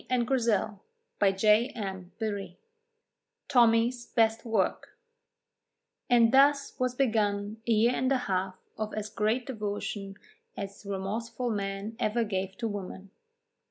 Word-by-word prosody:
CHAPTER 235 Hz, -5 st, +1 dB, 0.4 s
XXXII 200 Hz, -2 st, 0 dB, 0.9 s
TOMMY'S 235 Hz, -1 st, +3 dB
BEST 225 Hz, -1 st, +2 dB
WORK 220 Hz, -4 st, -1 dB, 1.1 s
And 235 Hz, -1 st, +5 dB
thus 280 Hz, +1 st, +4 dB
was 255 Hz, -1 st, 0 dB
begun 215 Hz, -4 st, 0 dB
a -, -, +2 dB
year 230 Hz, +3 st, +4 dB
and 255 Hz, +1 st, 0 dB
a 270 Hz, -, +4 dB
half 185 Hz, -4 st, -2 dB, 0.2 s
of 215 Hz, 0 st, -3 dB
as 215 Hz, 0 st, -4 dB
great 220 Hz, +3 st, 0 dB
devotion 205 Hz, -4 st, -4 dB, 0.4 s
as 200 Hz, +1 st, -7 dB
remorseful 230 Hz, +5 st, -3 dB
man 200 Hz, +1 st, -3 dB
ever 225 Hz, +2 st, +1 dB
gave 190 Hz, -2 st, -3 dB
to 230 Hz, -, -2 dB
woman. 195 Hz, -2 st, -6 dB
215 Hz, 110 wpm, -29 LUFS, 200-235 Hz, 1.1 s, And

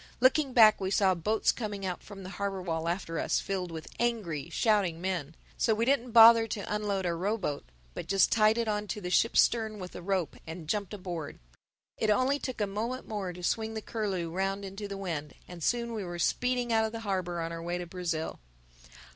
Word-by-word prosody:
Looking 265 Hz, +3 st, +4 dB
back 220 Hz, -4 st, +7 dB
we 190 Hz, -, 0 dB
saw 195 Hz, -1 st, +3 dB
boats 210 Hz, +6 st, +1 dB
coming 205 Hz, -4 st, -5 dB
out 180 Hz, -1 st, -3 dB
from 195 Hz, -2 st, -10 dB
the 185 Hz, -, -7 dB
harbor 200 Hz, -1 st, -1 dB
wall 165 Hz, -2 st, -2 dB
after 170 Hz, -1 st, -2 dB
us, -, -, +1 dB
filled 190 Hz, -3 st, -3 dB
with 160 Hz, -1 st, -7 dB
angry, 190 Hz, -11 st, -1 dB
shouting 195 Hz, -3 st, +1 dB
men. 175 Hz, -4 st, -3 dB, 0.2 s
So 220 Hz, -, +3 dB
we 225 Hz, +2 st, +1 dB
didn't 255 Hz, -2 st, +2 dB
bother 230 Hz, 0 st, +8 dB
to 210 Hz, -1 st, -4 dB
unload 200 Hz, -3 st, -1 dB
our 170 Hz, -1 st, 0 dB
rowboat 190 Hz, -4 st, -2 dB, 0.3 s
but -, -, -6 dB
just 195 Hz, -1 st, +3 dB
tied 215 Hz, 0 st, +4 dB
it 230 Hz, -1 st, 0 dB
on 210 Hz, 0 st, -1 dB
to 210 Hz, -, -4 dB
the 180 Hz, -3 st, -5 dB
ship's 230 Hz, -, +5 dB
stern 220 Hz, -2 st, -1 dB
with 185 Hz, -2 st, -8 dB
a -, -, -6 dB
rope 185 Hz, -2 st, -1 dB
and 165 Hz, -1 st, -7 dB
jumped 205 Hz, +3 st, -2 dB
aboard. 175 Hz, -6 st, -6 dB, 0.6 s
It 220 Hz, -, +1 dB
only 255 Hz, +6 st, +3 dB
took 255 Hz, -5 st, -4 dB
a -, -, +3 dB
moment 225 Hz, +6 st, -4 dB
more 205 Hz, -5 st, -3 dB
to 180 Hz, 0 st, -10 dB
swing 220 Hz, +4 st, -1 dB
the 220 Hz, -, -3 dB
Curlew 195 Hz, -7 st, -2 dB
round 195 Hz, +2 st, -2 dB
into 195 Hz, +2 st, -6 dB
the 200 Hz, 0 st, -6 dB
wind; 160 Hz, -7 st, -4 dB
and 175 Hz, -1 st, -10 dB
soon 235 Hz, +2 st, 0 dB
we 215 Hz, -3 st, -3 dB
were 175 Hz, -1 st, -5 dB
speeding 245 Hz, +6 st, 0 dB
out 220 Hz, 0 st, +4 dB
of 220 Hz, 0 st, -2 dB
the 230 Hz, -, -5 dB
harbor 185 Hz, -4 st, -2 dB
on 165 Hz, 0 st, -3 dB
our 165 Hz, 0 st, -5 dB
way 175 Hz, +1 st, -2 dB
to 180 Hz, -, -4 dB
Brazil. 170 Hz, -2 st, -3 dB
195 Hz, 215 wpm, -30 LUFS, 175-220 Hz, 0.6 s, bother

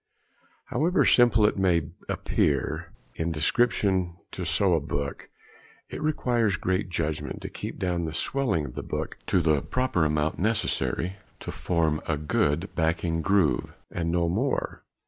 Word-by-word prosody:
However 160 Hz, +9 st, +2 dB
simple 115 Hz, -3 st, +5 dB
it 105 Hz, -, +1 dB
may 85 Hz, -5 st, +2 dB, 0.2 s
appear 70 Hz, -3 st, 0 dB, 0.2 s
in 80 Hz, +1 st, -2 dB
description 95 Hz, +1 st, +1 dB, 0.2 s
to 90 Hz, -, -5 dB
sew 85 Hz, +2 st, +3 dB
a 80 Hz, -, +3 dB
book, 70 Hz, -1 st, -4 dB, 0.6 s
it -, -, -5 dB
requires 120 Hz, -9 st, +1 dB
great 95 Hz, +1 st, -1 dB
judgment 80 Hz, -4 st, -2 dB
to -, -, -4 dB
keep -, -, -6 dB
down 90 Hz, -2 st, -1 dB
the 80 Hz, -, -3 dB
swelling 120 Hz, -, 0 dB
of 65 Hz, -, -8 dB
the -, -, -4 dB
book -, -, -4 dB
to 90 Hz, -, +3 dB
the 75 Hz, -3 st, +3 dB
proper 125 Hz, -10 st, 0 dB
amount 75 Hz, 0 st, 0 dB
necessary 100 Hz, -3 st, 0 dB, 0.2 s
to -, -, -5 dB
form 80 Hz, -3 st, 0 dB
a 80 Hz, -, +1 dB
good 75 Hz, +3 st, +1 dB
backing 80 Hz, 0 st, 0 dB
groove 95 Hz, -4 st, +2 dB, 0.2 s
and 85 Hz, -1 st, -1 dB
no 85 Hz, 0 st, +2 dB
more. 115 Hz, +11 st, -1 dB
85 Hz, 145 wpm, -27 LUFS, 80-100 Hz, 0.6 s, simple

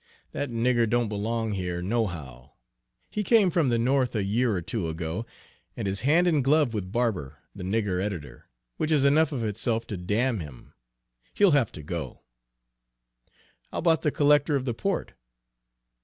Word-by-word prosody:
That 145 Hz, -, -3 dB
nigger 120 Hz, -1 st, +1 dB
don't 120 Hz, -1 st, +1 dB
belong 110 Hz, +1 st, -2 dB
here 90 Hz, -2 st, -3 dB
nohow. 85 Hz, -, -3 dB, 0.6 s
He 210 Hz, -, -2 dB
came 205 Hz, -3 st, +4 dB
from 160 Hz, -5 st, +2 dB
the 120 Hz, -, +2 dB
North 125 Hz, +1 st, +1 dB
a 105 Hz, -, +1 dB
year 115 Hz, +5 st, +1 dB
or 90 Hz, -, -2 dB
two 95 Hz, -1 st, -3 dB
ago, 80 Hz, +7 st, -4 dB, 0.5 s
and 110 Hz, -4 st, -2 dB
is 95 Hz, 0 st, 0 dB
hand 165 Hz, +7 st, +3 dB
in 155 Hz, -5 st, +3 dB
glove 140 Hz, -2 st, +3 dB
with 95 Hz, -4 st, -4 dB
Barber, 110 Hz, -, -1 dB, 0.2 s
the -, -, -10 dB
nigger 95 Hz, -1 st, -1 dB
editor, 80 Hz, -11 st, -6 dB, 0.3 s
which 155 Hz, -, -1 dB
is 150 Hz, -3 st, +3 dB
enough 150 Hz, +2 st, +4 dB
of 130 Hz, -5 st, -3 dB
itself 110 Hz, +2 st, -1 dB
to 105 Hz, -, -5 dB
damn 110 Hz, +6 st, 0 dB
him. 75 Hz, -7 st, -10 dB, 0.6 s
He'll 200 Hz, -3 st, +5 dB
have 140 Hz, -7 st, +3 dB
to 80 Hz, -, -8 dB
go!" 85 Hz, +1 st, -5 dB, 1.5 s
"How -, -, -5 dB
about 165 Hz, -1 st, +2 dB
the 150 Hz, -, +2 dB
collector 145 Hz, +1 st, +3 dB
of 135 Hz, -2 st, -1 dB
the 120 Hz, -, -1 dB
port?" 195 Hz, -, -2 dB
115 Hz, 170 wpm, -26 LUFS, 95-140 Hz, 1.5 s, He'll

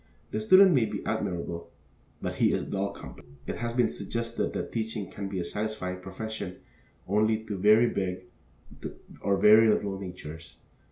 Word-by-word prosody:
The 110 Hz, -, -2 dB
student 190 Hz, -, +7 dB
may 130 Hz, -8 st, +4 dB
be -, -, -5 dB
admirable, 85 Hz, -1 st, -3 dB, 0.5 s
but -, -, -2 dB
he -, -, +4 dB
is -, -, 0 dB
dull 100 Hz, 0 st, -2 dB
company. 70 Hz, 0 st, -12 dB
It -, -, -4 dB
has 120 Hz, 0 st, -3 dB
been 125 Hz, 0 st, +2 dB
suggested 115 Hz, 0 st, -3 dB
that -, -, -4 dB
teaching 110 Hz, -4 st, -3 dB
can 100 Hz, -1 st, -5 dB
be 95 Hz, -1 st, -3 dB
a -, -, -1 dB
satisfying 95 Hz, -1 st, -3 dB
profession 100 Hz, 0 st, -6 dB, 0.5 s
only 110 Hz, +3 st, +2 dB
to 105 Hz, -2 st, -4 dB
very 105 Hz, +5 st, +5 dB
big 95 Hz, -4 st, -2 dB, 1.0 s
or 100 Hz, -1 st, +2 dB
very 110 Hz, +2 st, +7 dB
little 100 Hz, -2 st, -1 dB
natures. 85 Hz, -4 st, -9 dB
100 Hz, 160 wpm, -28 LUFS, 90-110 Hz, 1.0 s, student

